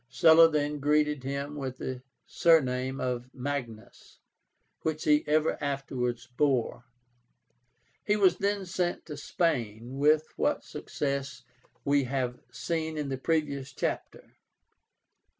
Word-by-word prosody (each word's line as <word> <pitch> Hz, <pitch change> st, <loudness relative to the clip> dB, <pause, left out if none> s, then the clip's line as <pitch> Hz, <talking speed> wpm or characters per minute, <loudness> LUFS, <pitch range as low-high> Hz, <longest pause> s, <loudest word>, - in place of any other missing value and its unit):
Sulla 165 Hz, +5 st, +7 dB
then 150 Hz, -1 st, -1 dB
greeted 150 Hz, -1 st, +2 dB
him 140 Hz, +2 st, -4 dB
with 130 Hz, -3 st, -5 dB
the 130 Hz, -1 st, -5 dB, 0.2 s
surname 130 Hz, -5 st, +2 dB
of 125 Hz, 0 st, -3 dB
Magnus, 125 Hz, -5 st, -6 dB, 0.6 s
which 155 Hz, -1 st, -2 dB
he 150 Hz, 0 st, +4 dB
ever 155 Hz, +1 st, +2 dB
afterwards 135 Hz, -3 st, -2 dB
bore. 125 Hz, -1 st, 0 dB, 1.2 s
He 210 Hz, -, +2 dB
was 185 Hz, -4 st, +4 dB
then 200 Hz, 0 st, 0 dB
sent 175 Hz, -1 st, -2 dB
to 150 Hz, -, -7 dB
Spain, 130 Hz, -6 st, -2 dB
with 155 Hz, +2 st, +4 dB
what -, -, +1 dB
success 140 Hz, -2 st, -4 dB, 0.4 s
we 140 Hz, -1 st, +3 dB
have 125 Hz, -1 st, -2 dB
seen 160 Hz, +6 st, -3 dB
in 150 Hz, -2 st, -2 dB
the 135 Hz, -, -2 dB
previous 140 Hz, -3 st, -1 dB
chapter. -, -, -4 dB
140 Hz, 115 wpm, -29 LUFS, 130-155 Hz, 1.2 s, Sulla